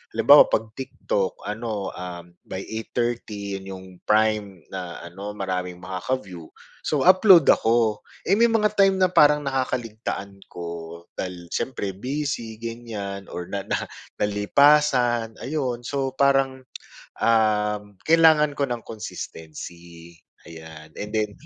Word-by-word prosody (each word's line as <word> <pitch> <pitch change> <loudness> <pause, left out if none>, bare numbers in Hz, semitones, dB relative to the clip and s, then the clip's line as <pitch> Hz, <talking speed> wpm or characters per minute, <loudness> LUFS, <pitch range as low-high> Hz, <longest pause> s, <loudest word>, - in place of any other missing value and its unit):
halimbawa - - +8
pag 110 0 -1
TikTok 105 -6 -3
ano, 105 -2 -4
um, 90 -1 -8 0.2
by 95 +1 -5
8:30 110 -3 -3
yun 95 - -12
yung 95 0 -11 0.2
prime 105 -5 +1
na 90 -3 -6
ano 100 +4 -7
maraming 90 -2 -4
makaka-view, 95 -3 -4 0.3
so 150 -3 -1
upload 185 -1 +7
ako. 115 -2 +2 0.2
Eh, 195 +4 +2
may 235 - +6
mga 220 -2 +2
time 195 -2 +4
na 185 -1 +2
parang 150 -3 +5
nakakaligtaan 120 -7 -3
ko, 85 -1 -8 0.2
dahil 90 -2 -6
syempre 105 -7 -2
busy 125 +1 -4
ganyan 110 -4 -6
or 90 0 -7
na 100 -1 -4
na - - -1 0.3
nalipasan 120 +2 +3
ayun. 130 -4 -2
So 135 0 -2
parang, 135 -1 +2 0.6
um 105 -2 +2
kailangan 160 -2 +5
ko 140 - +2
ng 120 -2 -4
consistency 85 -4 -9 0.3
ayan 80 -1 -11
and 105 +1 -6
then 105 -1 +1
110 Hz, 125 wpm, -24 LUFS, 95-130 Hz, 0.6 s, halimbawa